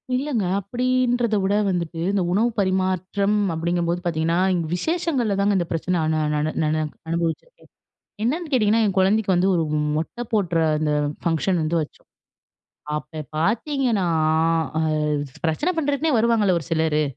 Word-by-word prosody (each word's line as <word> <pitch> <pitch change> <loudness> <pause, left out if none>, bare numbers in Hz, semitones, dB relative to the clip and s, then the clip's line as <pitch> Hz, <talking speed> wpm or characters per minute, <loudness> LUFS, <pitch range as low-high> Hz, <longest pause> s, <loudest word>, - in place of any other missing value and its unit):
இல்லங்க, 255 -4 -1 0.2
அப்படின்றதை 245 +1 0
விட 195 +1 +1 0.2
வந்துட்டு 170 -2 -2
இந்த 200 -1 +1
உணவு 220 +6 +2
பரிமாற்றம் 190 +1 0 0.2
அப்படிங்கும் 170 +1 -1
போது 175 +1 0
பார்த்தீங்கன்னா, 165 -1 0 0.4
விசேஷங்கள்ல 270 - 0
தாங்க 200 0 +2
இந்த 175 - 0
பிரச்சனை 175 +2 -1 0.2
நா 155 - +1
நா - - +1 0.2
நானு 155 0 +1 0.3
அனுபவிச்சிருக்கேன். 170 - -3 0.5
என்னன்னு 315 +8 -1
கேட்டீங்கன்னா, 225 -3 +3
என் 195 -3 -1
கொழந்தைக்கு 195 +1 +2
வந்து 180 +2 +2
ஒரு 165 - +1 0.3
மொட்டை 165 +10 -4
போடுற 180 -6 +1 0.2
அந்த 150 0 0 0.3
பங்ஷன் 170 +2 +1
வந்து 160 +2 0
வச்சோம். 150 - -9 0.9
அப்ப 155 +1 -6
பார்த்தீங்கன்னா, 230 - 0 0.7
அ - - +1 0.7
பிரச்சனை 295 - 0
பண்ணுறதுக்குன்னே 290 -1 +1
வருவாங்கல்ல 220 -5 +3
ஒரு 155 - -11
சிலரு! 160 -2 +1
190 Hz, 135 wpm, -23 LUFS, 170-235 Hz, 0.9 s, கேட்டீங்கன்னா